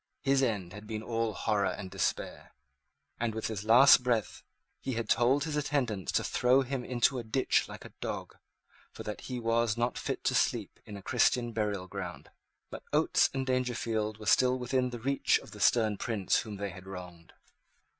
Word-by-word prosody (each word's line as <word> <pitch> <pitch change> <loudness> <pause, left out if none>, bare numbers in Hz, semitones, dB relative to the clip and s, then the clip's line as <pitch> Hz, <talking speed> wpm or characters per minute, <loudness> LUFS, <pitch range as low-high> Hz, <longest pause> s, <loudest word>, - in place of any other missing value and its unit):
His 135 0 +3
end 100 -8 -1
had 105 +1 -10
been 110 -1 -4
all 115 -1 -1
horror 100 -2 0
and 95 -2 -6
despair; 95 -2 -3 0.6
and, 115 -1 -1
with 110 - -3
his 105 -3 -3
last 125 +4 +7
breath, 120 -4 -1 0.4
he 130 - -4
had 115 -2 -3
told 130 +6 +3
his 155 -1 -3
attendants 135 -9 -1
to - - +2
throw 125 +2 +3
him 130 -1 -3
into 125 +1 +1
a - - -5
ditch 115 +4 +1
like - - -9
a - - -12
dog, - - -5 0.6
for - - -9
that 105 - -6
he 125 -1 -5
was 115 -1 +1
not 120 0 -1
fit - - -4
to - - +1
sleep - - 0
in 100 - -7
a 100 - -11
Christian 120 0 +2
burial 105 -4 -2
ground. 95 -2 -7 0.4
But - - -7
Oates - - +3
and 135 -1 -2
Dangerfield 115 -4 -1
were 110 - -10
still 125 +5 +4
within 125 0 0
the 120 - -6
reach 135 +4 +2
of - - -12
the - - -11
stern 110 -3 +3
prince 105 -5 0
whom 105 -2 -4
they 100 0 -4
had 95 +1 -12
wronged. 90 -3 -10
115 Hz, 190 wpm, -30 LUFS, 105-125 Hz, 0.6 s, last